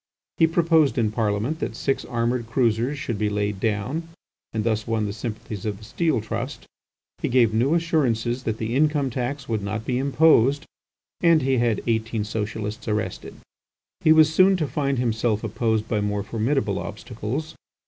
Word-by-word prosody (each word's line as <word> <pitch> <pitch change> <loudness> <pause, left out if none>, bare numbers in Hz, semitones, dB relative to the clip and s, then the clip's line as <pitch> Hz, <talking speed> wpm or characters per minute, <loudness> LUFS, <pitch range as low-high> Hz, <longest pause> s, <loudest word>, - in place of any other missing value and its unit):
He 165 - +5
proposed 165 -4 +3
in 110 -3 +2
Parliament 110 +7 -1
that - - -3
six 135 - -1
armoured 120 -1 -1
cruisers 120 +3 +1
should 115 -5 -4
be 105 -1 +1
laid 105 -1 -2
down, 115 - -2 0.4
and 110 -1 -2
thus 110 -1 -1
won 110 -2 0
the 100 - -3
sympathies 110 -2 -6
of 105 -2 -3
the 110 - -15
Steel 140 +2 0
Trust; 110 - -5 0.6
he - - 0
gave 120 -3 +4
new 130 +8 +2
assurances 130 -8 0
that 110 -1 -1
the 110 +2 -3
income 145 -2 +2
tax 130 +4 -3
would 110 -2 -1
not 105 +3 -4
be 125 -1 0
imposed, 140 0 +4 0.6
and 165 -4 +5
he 130 -1 +2
had 115 -3 +1
eighteen 110 -1 0
Socialists 110 +1 -4
arrested. 105 -1 -3 0.7
He 155 - +6
was 155 0 +6
soon 190 +3 +5
to 155 -4 -1
find 140 -2 -1
himself 110 -2 0
opposed 110 0 0
by 105 -2 0
more 105 0 -1
formidable 110 0 -1
obstacles. 120 +7 -5
115 Hz, 170 wpm, -24 LUFS, 110-140 Hz, 0.7 s, He